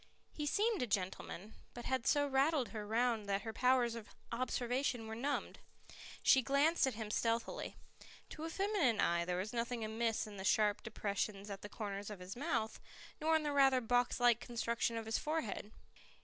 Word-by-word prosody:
He 300 -1 -3
seemed 425 +5 +2
a 250 - 0
gentleman, 195 0 -3 0.2
but 240 - -7
had 260 -2 0
so 290 -1 +4
rattled 275 -2 +2
her 210 0 -6
round 225 -2 +1
that 195 0 0
her 225 - -4
powers 250 -1 +3
of 230 -2 -8 0.2
observation 245 0 -1
were 220 - -5
numbed. 275 +6 -2 0.6
She 265 - +6
glanced 280 +4 +3
at 260 - -2
him 215 -1 -5
stealthily. 230 +1 -1 0.5
To 310 - -7
a - - -3
feminine 360 - +1
eye 170 0 +2
there 180 0 -1
was 195 +5 -3
nothing 235 -1 -1
amiss 225 +1 0
in 210 -1 -9
the 190 - -5
sharp 210 +1 +3
depressions 205 -2 -3
at 195 - -6
the 205 - -7
corners 200 -1 -5
of 210 - -6
his 180 +1 -7
mouth, 245 -5 -1 0.4
nor 320 +1 +3
in 315 - +2
the 295 - 0
rather 270 -2 +5
box 245 +1 +1
like 240 -1 +5
construction 235 -1 -1
of 225 - -4
his 225 0 0
forehead. 300 -9 -2
235 Hz, 185 wpm, -36 LUFS, 210-270 Hz, 0.6 s, She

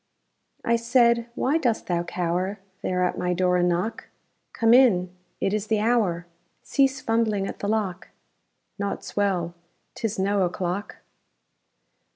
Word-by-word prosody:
I 235 0 +3
said, 235 0 +3
_Why 305 +5 +1
dost 240 -6 0
thou 175 -1 0
cower 180 +3 -2 0.2
There 180 0 0
at 180 - -1
my 180 0 0
door 180 0 +2
and 180 0 +2
knock? 180 +6 -2 0.5
Come 230 0 +3
in! 185 -8 +4 0.2
It 195 - 0
is 215 0 -1
the 220 -1 +1
hour! 210 -7 +1 0.4
Cease 270 -1 +2
fumbling 220 -3 +1
at - - -6
the 200 - -3
lock! 200 -5 -1 0.7
Naught's 200 0 -4
well! 185 -4 0 0.4
'Tis 225 -3 -3
no 200 +1 +1
o'clock! 180 +2 -2
200 Hz, 140 wpm, -25 LUFS, 180-230 Hz, 0.7 s, in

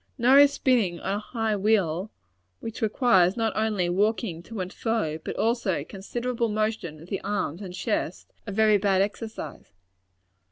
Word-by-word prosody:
Nor 255 +3 +6
is 285 0 +7
spinning 225 -12 +1
on 195 - -2
a 205 - -1
high 220 -1 -2
wheel 195 -3 +1 0.5
which 225 0 -7
requires 210 -4 +3
not 225 -2 0
only 215 -5 0
walking 195 -1 0
to 220 +4 -8
and 185 0 -4
fro, 220 -10 -1
but - - -4
also 225 - 0
considerable 235 +6 -3
motion 215 -7 -2
of 175 - -15
the 195 - -3
arms 195 -4 -2
and 190 -3 -6
chest - - -3
a - - -3
very 215 0 +4
bad 195 -1 +3
exercise. 220 +2 -6
210 Hz, 160 wpm, -26 LUFS, 185-225 Hz, 0.5 s, is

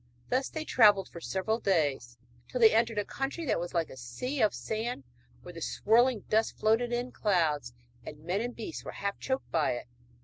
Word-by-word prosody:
Thus 260 +1 +1
they 315 -1 -5
travelled 205 -8 +5
for 170 - -10
several 205 +6 -1
days, 145 - 0 0.3
till 250 - -4
they 225 -2 +7
entered 225 0 +2
a 205 - 0
country 280 +5 -4
that 255 - +1
was 175 +1 -5
like 165 -1 0
a - - -9
sea 190 - -4
of 215 - +4
sand, 220 - -3 0.4
where 180 - -9
the 165 - -9
swirling 235 +5 +3
dust 220 +1 0
floated 225 +3 +2
in 245 +1 -2
clouds, 160 - +1 0.3
and 150 0 -10
men 180 +5 -1
and 245 +1 -4
beasts 225 - -6
were - - -7
half 200 0 -3
choked 265 0 -3
by 155 -6 +2
it. 120 - -6
215 Hz, 200 wpm, -30 LUFS, 170-240 Hz, 0.4 s, they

